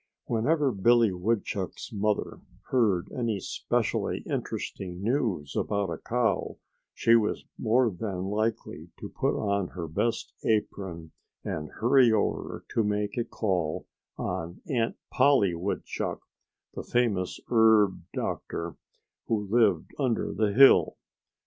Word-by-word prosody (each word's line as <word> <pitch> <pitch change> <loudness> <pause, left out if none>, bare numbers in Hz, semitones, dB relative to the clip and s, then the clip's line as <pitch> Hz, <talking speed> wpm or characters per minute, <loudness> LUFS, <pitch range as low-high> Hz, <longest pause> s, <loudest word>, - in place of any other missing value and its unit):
Whenever 140 +5 +1
Billy 115 +1 +4
Woodchuck's 100 -1 -2
mother 105 0 -1 0.3
heard 105 -8 +2
any 115 -5 -1
specially - - -1
interesting 90 -2 -4
news 110 - -1
about 100 -4 -1
a 80 - -4
cow 120 -1 -1 0.4
she 115 - +4
was 110 -2 +1
more 120 +1 +3
than 95 -1 -4
likely 105 +3 -2
to - - -7
put - - -1
on 100 -3 0
her 85 -2 -6
best 115 +9 -1
apron 95 -6 -2 0.3
and 75 -1 -4
hurry 125 +1 +4
over 110 -2 -1
to 115 - +1
make 105 0 -1
a 120 - 0
call 90 -9 -2 0.3
on 85 +2 -4
Aunt 115 -4 0 0.2
Polly 120 -11 +4
Woodchuck, 90 +4 -3 0.5
the - - -5
famous 105 -7 0
herb 110 -5 +4
doctor, 85 0 -4 0.5
who 105 -3 -1
lived 105 -9 +3
under 125 -5 0
the 110 -2 +1
hill. 135 +6 +6
105 Hz, 120 wpm, -28 LUFS, 95-115 Hz, 0.5 s, hill